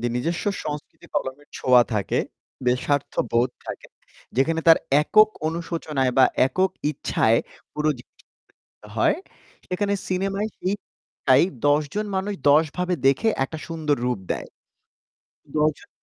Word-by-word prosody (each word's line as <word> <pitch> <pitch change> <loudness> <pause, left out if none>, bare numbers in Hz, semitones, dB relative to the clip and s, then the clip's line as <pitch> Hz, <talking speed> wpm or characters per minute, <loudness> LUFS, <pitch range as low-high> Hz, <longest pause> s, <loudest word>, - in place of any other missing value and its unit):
যে 120 - -1
নিজস্ব 165 +8 -2 0.2
সংস্কৃতি 150 -1 -7
কলমের 135 +3 -3
ছোঁয়া 125 -1 +5
থাকে, 100 -2 0 0.5
বে 125 - +4
স্বার্থ 145 -1 0 0.2
বোধ 120 +2 +3 0.2
থাকে, - - -7 0.5
যেখানে 160 +5 +2
তার 165 - +9 0.2
একক 215 +7 +6 0.2
অনুশোচনায় 160 -6 -2
বা 130 - +8 0.2
একক 185 +6 +1 0.2
ইচ্ছায় 115 -5 +2 0.3
পুরো 150 0 +1
জিনিসটা 125 - -19 0.7
হয়, - - +3 0.5
সেখানে 200 +2 -1 0.2
সিনেমায় 195 +3 -1
সেইটাই 185 -7 0 0.2
১০ 145 +1 +4
জন 210 +1 -1
মানুষ 195 +2 -1 0.2
১০ 150 +3 +6
ভাবে 180 0 0
দেখে 140 - +3 0.2
একটা 160 +4 -7
সুন্দর 155 -3 0
রূপ 125 -5 0
দেয়। - - -6 1.1
১০ 155 +1 +4
জন - - -18
155 Hz, 130 wpm, -24 LUFS, 135-185 Hz, 1.1 s, তার